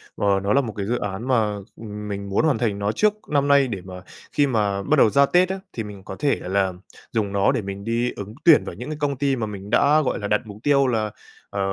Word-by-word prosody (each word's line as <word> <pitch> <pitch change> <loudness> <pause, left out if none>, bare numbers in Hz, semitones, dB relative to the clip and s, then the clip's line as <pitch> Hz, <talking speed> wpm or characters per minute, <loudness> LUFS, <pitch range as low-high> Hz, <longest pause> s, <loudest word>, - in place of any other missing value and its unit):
Ờ, 100 - -1 0.2
nó 100 - +1
là 140 - +4
một 115 -6 -5
cái 100 - -2
dự 120 +3 0
án 105 +5 -4
mà, 110 -5 +2 0.2
ừm, 105 -1 -7
mình 100 -1 -5
muốn 100 +11 +1
hoàn 140 -7 +2
thành 105 -3 -1
nó 100 +1 0
trước 210 - +2 0.2
năm 145 -1 +2
nay 140 -2 +5
để 100 -6 -4
mà, 90 0 -9 0.3
khi 145 -1 +2
mà 105 -5 0
bắt 155 +1 +2
đầu 110 - +6
ra 140 +3 +5
Tết 180 +5 +3
á, 190 0 -3
thì 115 - -3
mình 100 -2 -10
có 95 - -7
thể 145 -2 +2
là 95 0 0 0.4
dùng 105 -3 -1
nó 100 -1 +3
để - - -1
mình 100 0 -6
đi 115 +2 0
ứng 100 +2 -7
tuyển 165 -3 +7
vào - - -7
những 125 - -7
cái 155 - -4
công 140 -2 -1
ty 140 -1 +1
mà 115 -3 -2
mình 100 -1 -8
đã, 145 +6 +4
gọi 130 - -1
là, 105 - -3
đặt 105 0 +2
mục 105 -1 -10
tiêu 140 -2 +4
là, 110 -3 0 0.4
ờ, 100 - -5
110 Hz, 270 wpm, -23 LUFS, 100-140 Hz, 0.4 s, tuyển